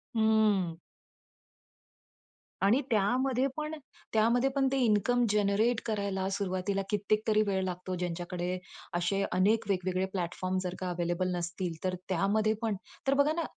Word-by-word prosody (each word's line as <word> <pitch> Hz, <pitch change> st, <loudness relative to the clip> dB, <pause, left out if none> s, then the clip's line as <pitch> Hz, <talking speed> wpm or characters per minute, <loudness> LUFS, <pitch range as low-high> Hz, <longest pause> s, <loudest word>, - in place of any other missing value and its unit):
हंम्म. 215 Hz, -6 st, +3 dB, 1.9 s
आणि 230 Hz, +8 st, +4 dB
त्यामध्ये 250 Hz, +5 st, +2 dB
पण 305 Hz, 0 st, -3 dB, 0.4 s
त्यामध्ये 235 Hz, +4 st, +3 dB
पण 270 Hz, -1 st, +3 dB
ते 275 Hz, -, +1 dB
इन्कम 235 Hz, +2 st, +3 dB
जनरेट 210 Hz, +3 st, +2 dB
करायला 200 Hz, -3 st, -1 dB
सुरुवातीला 195 Hz, 0 st, -1 dB
कित्येक 210 Hz, +1 st, +1 dB
तरी 215 Hz, -1 st, +4 dB
वेळ 190 Hz, -1 st, +1 dB
लागतो. 185 Hz, 0 st, -3 dB
ज्यांच्याकडे 175 Hz, +1 st, -3 dB, 0.4 s
असे 195 Hz, +3 st, 0 dB
अनेक 205 Hz, +5 st, +3 dB
वेगवेगळे 185 Hz, -1 st, 0 dB
प्लॅटफॉर्म 185 Hz, +1 st, -2 dB
जर 180 Hz, 0 st, -3 dB
का 185 Hz, -, -3 dB
अवेलेबल 175 Hz, +1 st, -1 dB
नसतील. 175 Hz, 0 st, -3 dB
तर 185 Hz, -1 st, 0 dB
त्यामध्ये 205 Hz, +4 st, +2 dB
पण 225 Hz, -3 st, 0 dB, 0.3 s
तर 270 Hz, -, +4 dB
बघा 285 Hz, +2 st, +3 dB
ना, 335 Hz, +1 st, -1 dB
200 Hz, 135 wpm, -30 LUFS, 185-220 Hz, 1.9 s, आणि